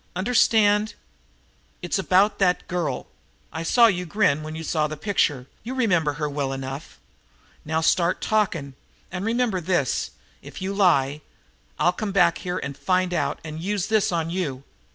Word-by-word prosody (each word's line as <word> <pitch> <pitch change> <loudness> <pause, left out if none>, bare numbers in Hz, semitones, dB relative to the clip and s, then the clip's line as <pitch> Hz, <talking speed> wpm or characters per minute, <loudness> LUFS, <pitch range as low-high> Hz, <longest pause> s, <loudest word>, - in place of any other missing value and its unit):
Understand? 210 0 +3 0.9
It's 175 +2 -1
about 190 +2 +3
that 180 -2 +1
girl. 175 -3 -2 0.5
I 160 - -4
saw 235 +8 +5
you 180 -5 +1
grin 160 -4 +2
when 155 +1 -6
you 160 - -6
saw 155 -1 0
the 155 0 -6
picture; 145 -9 0 0.2
you 250 +4 -5
remember 175 - +2
her 150 +1 -2
well 140 -2 -2
enough. 135 +3 -7 0.7
Now 160 +1 0
start 170 +2 +2
talking, 175 -10 0 0.4
and 180 +1 -4
remember 225 -4 0
this, 170 -6 0 0.3
if - - -10
you 190 +1 -3
lie, 150 -7 +2 0.6
I'll 175 - +3
come 200 +2 -3
back 175 -3 +3
here 180 0 -3
and 140 -5 -5
find 185 +3 0
out - - -1
and 155 0 -7
use 195 0 -1
this 220 -3 +2
on 165 -1 -1
you." 145 -8 -3
180 Hz, 160 wpm, -24 LUFS, 155-200 Hz, 0.9 s, saw